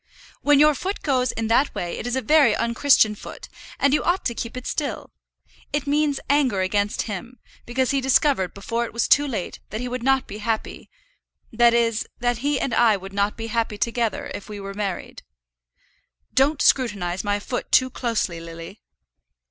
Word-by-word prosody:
"When 290 -1 +4
your 300 +1 +6
foot 380 +8 -4
goes 255 -4 +1
in 225 - -3
that 260 +5 +2
way 175 -1 -4
it 240 - -5
is 245 - -1
a 260 - -1
very 295 -7 +5
unchristian 235 -2 +3
foot, 210 - -10 0.3
and 280 0 +2
you 300 - +2
ought 355 +2 0
to 235 - 0
keep 230 +1 -6
it 255 - -7
still. 295 -3 -3 0.6
It 295 -1 -1
means 290 0 +1
anger 270 -9 +2
against 205 +2 0
him, 230 +4 -7 0.3
because 255 +1 0
he 275 -1 +1
discovered 265 - +2
before 230 +4 -2
it - - -9
was 235 - 0
too 290 0 +4
late 215 -9 -4
that 215 - -5
he 250 - -3
would 250 0 -4
not 270 +1 +2
be 205 - -8
happy, 220 0 -3 0.6
that 235 +1 +5
is, 230 -1 +1
that 245 -1 -1
he 285 +1 0
and 260 - -2
I 225 -2 +4
would 195 +1 -10
not 200 +1 0
be 225 - -5
happy 225 -2 -2
together 240 +6 -1
if 205 - -8
we 210 -1 -7
were 195 0 -6
married." 200 -2 -5 1.1
"Don't 280 +3 +2
scrutinize 200 -8 +1
my 205 0 0
foot 245 +4 -5
too 255 0 +4
closely, 225 -9 -2
Lily." 165 +4 -10
235 Hz, 190 wpm, -23 LUFS, 210-270 Hz, 1.1 s, your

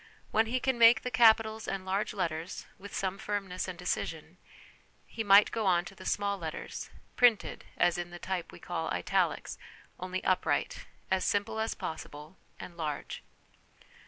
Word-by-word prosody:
When 220 +1 +3
he 255 +3 0
can 260 -2 0
make 230 0 +7
the 250 - -3
capitals 220 -1 +4
and 195 -1 -3
large 195 +3 -1
letters, 170 -3 -3
with 200 +2 -10
some 195 -1 -2
firmness 195 -3 -3
and 185 -2 -6
decision, 170 -1 -4 0.7
he 225 - -5
might 205 0 +7
go 220 -3 -1
on 175 -1 +3
to 185 - -9
the - - -9
small 200 -1 0
letters 160 -2 -6 0.3
'printed' 240 -4 +3
as 175 0 +3
in 175 0 -4
the 175 - -9
type 180 0 -4
we - - -11
call - - -4
' - - -5
italics,' - - 0 0.4
only 185 +1 -4
upright, 185 - 0 0.2
as 190 -1 +2
simple 205 +2 0
as 220 +1 -1
possible, 150 +1 -7 0.2
and 175 - -9
large. 150 -3 -4
190 Hz, 165 wpm, -30 LUFS, 175-220 Hz, 0.7 s, make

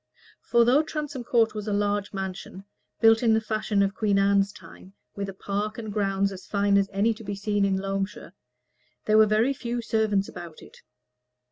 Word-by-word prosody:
For 235 -1 +5
though 260 +5 +5
Transome 300 -4 -5
Court 230 -2 +2
was 210 0 -6
a 210 - -1
large 205 0 -1
mansion, 190 0 -6 0.4
built 225 0 +6
in 225 -2 +4
the - - +3
fashion 215 -2 0
of 195 0 -1
Queen 210 -2 +1
Anne's 200 0 +3
time, 185 +1 -15 0.2
with 200 -1 -4
a - - -7
park 205 +2 -3
and 220 -3 -6
grounds 195 -1 0
as 190 -2 -10
fine 200 -1 +1
as 200 0 +2
any 205 +4 +1
to 225 +1 -12
be 205 -1 -4
seen 205 0 0
in 195 -1 +1
Loamshire, 195 +1 -4 0.7
there 215 0 +4
were 215 - +6
very 220 +6 +2
few 240 -2 -4
servants 220 -3 0
about 170 -2 -10
it. - - -16
205 Hz, 195 wpm, -26 LUFS, 195-220 Hz, 0.7 s, built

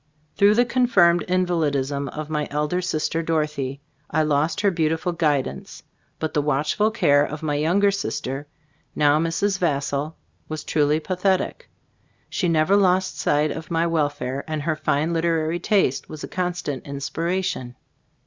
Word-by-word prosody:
Through 205 +1 +5
the 245 +2 +4
confirmed 200 -9 +4
invalidism 145 -7 0
of 150 +2 -6
my 150 -1 -2
elder 150 +5 -1
sister, 165 -2 -1
Dorothea, 150 -4 -1 0.3
I 155 - +1
lost 155 +5 +1
her 200 -1 +3
beautiful 165 +1 0
guidance, 150 -5 -2 0.3
but 160 - -3
the 150 - +2
watch 150 0 0
ful 215 +1 +2
care 170 -11 +3
of 150 +2 -5
my 150 -2 0
younger 175 +8 +3
sister, 145 -7 -4 0.5
now 150 0 +4
Mrs. 190 +5 0
Vassall, 145 -1 -1 0.3
was 155 -1 -4
truly 150 0 +2
pathetic. 185 +3 -1 0.6
She 180 - 0
never 165 +4 +3
lost 185 -2 +2
sight 150 +1 +2
of 160 - -7
my 165 0 +1
welfare, 145 -5 -1
and 155 -2 -3
her 155 0 0
fine 155 +1 0
literary 165 0 0
taste 190 - +1
was 155 -2 -8
a - - -4
constant 180 -7 -3
inspiration. 140 -1 -3
160 Hz, 150 wpm, -23 LUFS, 145-180 Hz, 0.6 s, Through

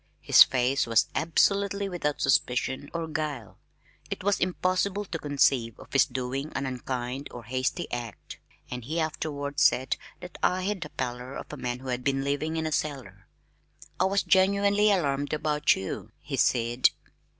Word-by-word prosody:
His - - +6
face 130 +1 +4
was 115 -1 +3
absolutely 200 +5 +1
without 165 -6 -2
suspicion 130 +1 +1
or 165 -1 -3
guile. 150 -8 -4 0.5
It - - -5
was 200 0 +2
impossible 185 +2 0
to 165 -3 -5
conceive 135 -6 +1
of - - -14
his 135 - +5
doing 130 +3 -3
an 140 - -1
unkind 130 +1 -4
or 120 - -9
hasty 130 +8 -1
act, 120 -3 -6 0.3
and 125 -1 -5
he 155 +8 -3
afterward 145 -2 -3
said 130 +1 +3 0.2
that 180 0 -10
I 185 0 +1
had 200 -1 -2
the 150 - -5
pallor 125 0 -5
of - - -8
a - - -6
man 120 0 -3
who 130 - -7
had 125 0 -2
been 135 0 0
living 150 +3 -1
in 160 - -1
a 155 - -2
cellar. 125 -12 -4 0.7
"I 185 - +4
was 195 +1 +2
genuinely 200 +2 +4
alarmed 145 -7 0
about 150 -1 +2
you," 95 - -5
he - - -6
said. 120 +1 +3
145 Hz, 165 wpm, -27 LUFS, 125-175 Hz, 0.7 s, His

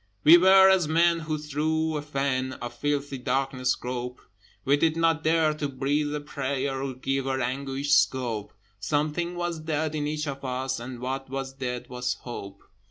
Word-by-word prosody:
We 160 +3 +10
were 190 +2 +7
as 190 -4 +4
men 170 +2 +3
who 155 -1 -3
through 155 +2 -1
a 150 - -1
fen 135 -3 -1
Of 120 -1 -7
filthy 145 +1 -2
darkness 130 0 0
grope: 125 0 -5 0.5
We 140 - +4
did 160 +2 +1
not 165 -1 +2
dare 160 -1 +3
to 150 -1 -3
breathe 145 +3 -1
a - - -2
prayer, 135 -2 -3
Or 135 -1 -4
give 135 +1 -2
our 135 0 0
anguish 135 +3 -1
scope: 120 -7 +1 0.3
Something 150 - -1
was 175 -2 -2
dead 155 0 -2
in 150 -1 -1
each 150 0 -2
of 140 -1 -5
us, 130 0 -2
And 120 0 -7
what 135 +1 -4
was 135 0 -4
dead 125 -2 -4
was 125 0 -2
Hope. 100 -5 -8
140 Hz, 175 wpm, -26 LUFS, 130-155 Hz, 0.5 s, We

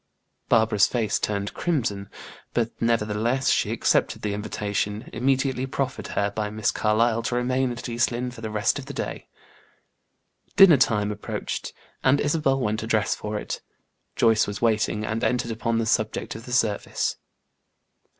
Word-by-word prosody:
Barbara's 110 -3 +4
faced 110 -4 -1
turned 100 -1 -2
crimson; 110 - -1 0.5
but 115 -1 +1
nevertheless 115 +3 +1
she - - +1
accepted - - +1
the 105 -1 -1
invitation, 105 +1 -3
immediately 130 +1 0
proffered 135 0 -3
her 100 0 +1
by 105 0 -2
Miss 110 0 0
Carlyle 115 +2 +2
to 115 +2 -2
remain 125 +1 +1
at 120 - -6
East 120 +1 +1
Lynne 125 +1 -3
for 120 - -11
the 110 - -4
rest 105 -1 +1
of - - -9
the - - -7
day. - - -5 1.3
Dinner 195 -7 +8
time 105 -5 +2
approached, 105 - -4 0.3
and 135 +2 +4
Isabel 145 -2 +1
went 110 -3 0
to 110 - -5
dress 110 -2 +2
for 105 0 -4
it. - - -5 0.5
Joyce 115 -1 +3
was 100 0 -4
waiting, 110 -2 +1
and 110 +2 -2
entered 120 -2 0
upon 115 +1 -1
the 115 - 0
subject 110 0 0
of 115 - -9
the 125 - -8
service. 110 -4 0
115 Hz, 160 wpm, -25 LUFS, 105-125 Hz, 1.3 s, Dinner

